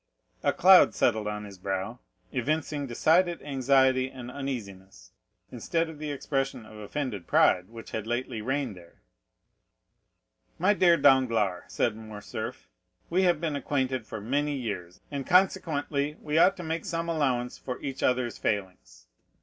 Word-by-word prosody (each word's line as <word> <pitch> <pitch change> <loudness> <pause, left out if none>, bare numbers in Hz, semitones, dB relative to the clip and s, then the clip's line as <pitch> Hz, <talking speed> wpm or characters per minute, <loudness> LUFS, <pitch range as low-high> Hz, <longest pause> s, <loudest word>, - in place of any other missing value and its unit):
A - - +2
cloud 185 +1 +6
settled 110 -3 +1
on 105 0 -4
his 100 -2 -11
brow, 95 +5 -3 0.3
evincing 145 +2 -1
decided 170 +8 +2
anxiety 130 -1 +2
and 125 -2 -9
uneasiness, 105 -9 -7 0.4
instead 165 +7 -1
of 155 -2 -10
the 155 -1 -4
expression 135 -4 -2
of 110 0 -13
offended 105 - -4
pride 90 0 +3
which 115 0 -11
had 110 0 -4
lately 120 -1 -2
reigned 130 -1 -2
there. 85 -2 -17 1.5
"My 190 +5 +3
dear 175 -4 +5
Danglars," 115 - +3
said 115 - 0
Morcerf, 110 -2 -7 0.4
"we 180 +2 +3
have 175 -4 +3
been 160 -3 -2
acquainted 130 -4 -1
for 110 - -6
many 145 +7 -1
years, 95 -9 -5
and 140 -2 -4
consequently 150 -5 +1
we 150 0 -4
ought 195 +3 +5
to 180 - -6
make 160 0 -3
some 165 -2 -2
allowance 130 -7 -1
for 125 - -5
each 135 -1 -5
other's 125 -2 0
failings. 95 -3 -3
130 Hz, 145 wpm, -28 LUFS, 110-150 Hz, 1.5 s, cloud